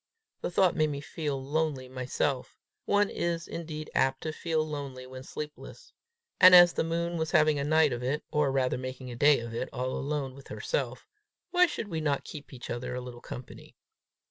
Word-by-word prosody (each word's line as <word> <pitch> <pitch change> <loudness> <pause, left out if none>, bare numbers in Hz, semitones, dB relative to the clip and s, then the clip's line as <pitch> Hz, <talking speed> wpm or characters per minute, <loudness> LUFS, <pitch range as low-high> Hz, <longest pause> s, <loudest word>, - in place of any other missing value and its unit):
The - - -2
thought 180 0 +3
made 155 -1 +2
me 140 -1 -3
feel 145 -1 -3
lonely 140 -1 -1
myself: 130 +1 -2 0.3
one 205 0 +3
is 170 -1 -2
indeed 155 -2 -6
apt 135 0 +2
to 155 - -2
feel 160 0 -1
lonely 140 -4 -6
when 130 0 -9
sleepless; 150 +3 -9 0.5
and 185 -1 +10
as 175 -1 +9
the - - 0
moon 170 +1 -1
was 160 -1 -1
having 155 -3 +4
a - - 0
night 155 -1 +4
of 120 - -4
it, 135 +5 -1
or 150 -3 +2
rather 130 -2 +1
making 130 0 -6
a - - -6
day 145 +4 +5
of 115 0 -7
it, 120 - -3
all 130 0 -2
alone 140 -1 -2
with 135 0 -13
herself, - - -3 0.5
why 360 0 +5
should 230 - -4
we 160 -5 -3
not 145 -2 0
keep 145 -1 -9
each 125 -3 -8
other 125 +1 -4
a - - -2
little 125 -1 -9
company? 125 - -10
145 Hz, 195 wpm, -29 LUFS, 130-160 Hz, 0.5 s, and